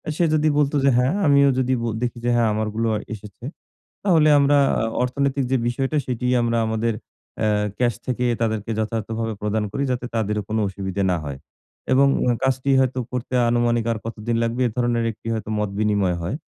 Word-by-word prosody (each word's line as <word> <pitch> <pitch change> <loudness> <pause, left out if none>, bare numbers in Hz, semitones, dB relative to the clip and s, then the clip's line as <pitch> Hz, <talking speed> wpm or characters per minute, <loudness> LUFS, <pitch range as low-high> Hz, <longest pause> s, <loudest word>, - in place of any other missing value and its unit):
সে 175 - +1
যদি 155 0 +3
বলতো 150 0 +2
যে 140 - +5
"হ্যাঁ।" 125 +5 +2
আমিও 140 -1 +5
যদি 130 0 +1
ব - - -4 0.2
দেখি 120 -1 -2
যে - - +2
হ্যাঁ, 115 -2 +3
আমারগুলোও 110 +1 -1 0.2
এসেছে। 105 +1 -11 0.6
তাহলে 165 -6 +4
আমরা 140 +1 +4 0.2
আ - - 0 0.2
অর্থনৈতিক 135 +2 0
যে 130 - +3
বিষয়টা 135 +5 -1
সেটি 125 -1 -3 0.2
আমরা 115 0 0
আমাদের 110 +1 0 0.5
অ্যা 110 - +1 0.3
ক্যাশ 120 -1 +2
থেকে 125 -1 -1 0.2
তাদেরকে 110 -1 -1
যথার্থভাবে 110 +1 -2
প্রদান 105 +1 -1
করি 140 - -2
যাতে 125 -1 -2
তাদেরও 105 -1 -1
কোনো 110 +1 0
অসুবিধে 95 0 -3
না 90 - +1
হয়। 70 -2 -6 0.5
এবং 140 +2 +5 0.4
কাজটি 135 +1 +1
হয়তো 130 -1 +1
করতে 125 0 -4 0.2
আনুমানিক 120 -1 +1
আর 115 - -1
কতদিন 115 0 -3
লাগবে 115 +2 -1
এ - - -2
ধরনের 120 -1 +1
একটি 110 - -13
হয়তো 110 -2 -4
মত 105 -1 -1
বিনিময় 100 -4 +1
হয়। 85 +9 -3
115 Hz, 180 wpm, -22 LUFS, 110-130 Hz, 0.6 s, যে